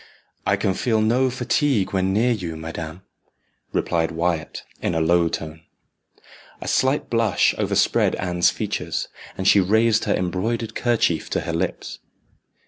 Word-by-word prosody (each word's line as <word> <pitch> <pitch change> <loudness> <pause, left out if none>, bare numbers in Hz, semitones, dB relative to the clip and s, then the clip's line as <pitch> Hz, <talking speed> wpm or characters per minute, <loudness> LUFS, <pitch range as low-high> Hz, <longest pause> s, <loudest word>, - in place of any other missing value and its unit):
"I - - +4
can 95 - 0
feel 110 +2 0
no 120 +5 +2
fatigue 125 -3 0
when 95 0 +1
near 115 +5 +2
you, 90 -8 -3
madam," 80 +2 -7 0.7
replied 80 -1 0
Wyat, 85 0 -2 0.2
in 85 - -1
a - - +2
low 85 +1 +3
tone. 80 0 -6 1.0
A - - -7
slight 135 +3 +1
blush 115 -2 +2
overspread - - +2
Anne's 90 -1 +1
features, - - -3 0.3
and 95 - -1
she 100 - +6
raised 110 +4 +3
her - - +2
embroidered 105 +6 -2
kerchief 115 -9 0
to - - -1
her 85 - -4
lips. 85 - -3
95 Hz, 140 wpm, -22 LUFS, 85-115 Hz, 1.0 s, she